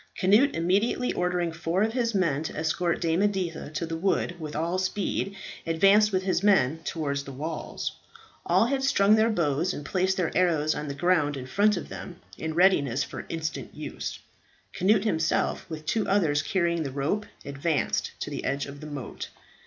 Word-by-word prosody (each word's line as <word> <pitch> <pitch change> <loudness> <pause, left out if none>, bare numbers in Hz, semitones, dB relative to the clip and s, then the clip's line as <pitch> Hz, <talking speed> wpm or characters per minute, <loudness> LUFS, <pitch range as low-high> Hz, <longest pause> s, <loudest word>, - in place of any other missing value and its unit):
Cnut 210 +9 +4
immediately 195 +9 +1
ordering 180 -1 0
four 165 +4 0
of 220 +1 0
his 235 -3 0
men 165 -7 +1
to 160 - -5
escort 165 +2 0
Dame 165 +1 +1
Editha 190 -7 -1
to 165 - -2
the 165 0 -4
wood 175 0 0
with 155 -2 -6
all 170 +4 0
speed, 195 +1 -2 0.3
advanced 195 +6 +5
with 185 -1 0
his 185 -2 +1
men 160 -8 +3
towards 140 -4 -2
the 140 - -8
walls. 155 +4 -4 0.5
All 185 +5 +3
had 270 +2 0
strung 205 -6 +4
their 220 +1 +4
bows 170 -3 0
and 145 - -7
placed 190 +2 0
their 180 -3 -1
arrows 160 -4 +2
on 150 - -4
the 140 - -4
ground 150 -2 +2
in 130 - -6
front 205 +9 +2
of - - -6
them 180 -1 -8 0.2
in 160 0 -4
readiness 145 -8 +3
for - - -8
instant 160 -1 -4
use. - - -5 0.6
Cnut 195 +2 +3
himself, 165 -6 0
with 155 -1 -7
two 220 +6 0
others 165 -7 +3
carrying 170 +1 0
the 145 - -2
rope, 145 +10 -2 0.2
advanced 140 +2 -1
to - - -4
the - - -4
edge 140 +2 -1
of 140 +1 -10
the 155 - -7
moat. 145 -4 -6
170 Hz, 185 wpm, -27 LUFS, 155-195 Hz, 0.6 s, advanced